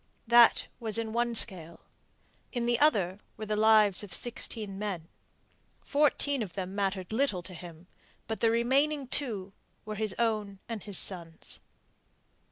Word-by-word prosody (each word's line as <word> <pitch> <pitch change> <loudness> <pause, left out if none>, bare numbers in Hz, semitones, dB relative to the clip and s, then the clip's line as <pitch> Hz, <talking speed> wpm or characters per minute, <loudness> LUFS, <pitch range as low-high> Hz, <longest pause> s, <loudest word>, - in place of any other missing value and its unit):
That 235 0 +6
was 225 -2 +1
in 225 -1 -2
one 235 0 0
scale; 170 -7 +1 0.7
in 240 -2 -2
the 240 0 +1
other 200 - +2 0.2
were 215 - -5
the 210 0 -1
lives 215 -2 +5
of 200 - -9
sixteen 215 -2 -3
men. 190 -6 -4 0.7
Fourteen 285 -2 +1
of 200 -5 -5
them 190 -1 -4
mattered 195 -1 -2
little 220 -8 0
to 185 - -9
him, 170 -1 -11 0.4
but 220 - -4
the 230 - +3
remaining 270 +5 +2
two 215 -8 -2 0.3
were 215 - -5
his 215 -2 -1
own 215 -4 -1
and 225 -3 -5
his 200 -2 -1
son's. 170 -4 -3
215 Hz, 150 wpm, -30 LUFS, 190-235 Hz, 0.7 s, That